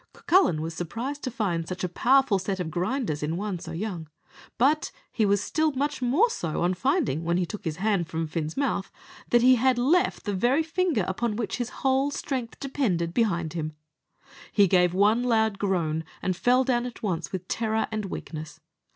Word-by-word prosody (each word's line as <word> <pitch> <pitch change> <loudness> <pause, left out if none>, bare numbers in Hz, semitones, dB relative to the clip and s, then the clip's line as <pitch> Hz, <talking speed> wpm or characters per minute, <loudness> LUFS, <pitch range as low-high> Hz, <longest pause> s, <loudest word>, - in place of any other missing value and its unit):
Cucullin 345 - +3
was 165 +1 -4
surprised 235 - -4
to 255 - -3
find 190 -9 -2
such 185 +1 -5
a - - +1
powerful 245 +3 +3
set 190 +1 -3
of 165 -3 -3
grinders 180 - -1
in 155 +3 -2
one 200 -2 -3
so - - -8
young; 175 -3 -4 0.5
but 290 +5 +2 0.2
he 215 -3 +1
was 200 0 +2
still 315 -1 +1
much 285 +1 -2
more 275 - +4
so 165 - -2
on 180 +1 +2
finding, 250 - 0
when 170 +1 +1
he 180 - +1
took 210 +4 -7
his 160 -2 -2
hand 195 -2 0
from 165 0 -2
Fin's 155 0 -4
mouth, 250 -8 -1 0.4
that 240 0 +4
he 255 0 +7
had 255 +1 +3
left 310 +10 +2
the 205 - -1
very 245 +11 +2
finger 325 - 0
upon 215 +4 -1
which 225 0 -2
his 245 -1 -3 0.2
whole 265 +1 +3
strength 260 -4 -4
depended, 200 -12 -1
behind 175 -9 0
him. 155 -2 -3 0.8
He 200 -2 +5
gave 180 -1 +3
one 210 +5 +4
loud 220 -4 +1
groan, 165 -5 0 0.2
and 185 - 0
fell 245 +9 +3
down 245 -1 0
at 240 - -10
once 170 -5 -2
with 185 -1 -5
terror 220 -1 0
and 215 -1 -2
weakness. 155 -4 -7
210 Hz, 195 wpm, -26 LUFS, 175-255 Hz, 0.8 s, he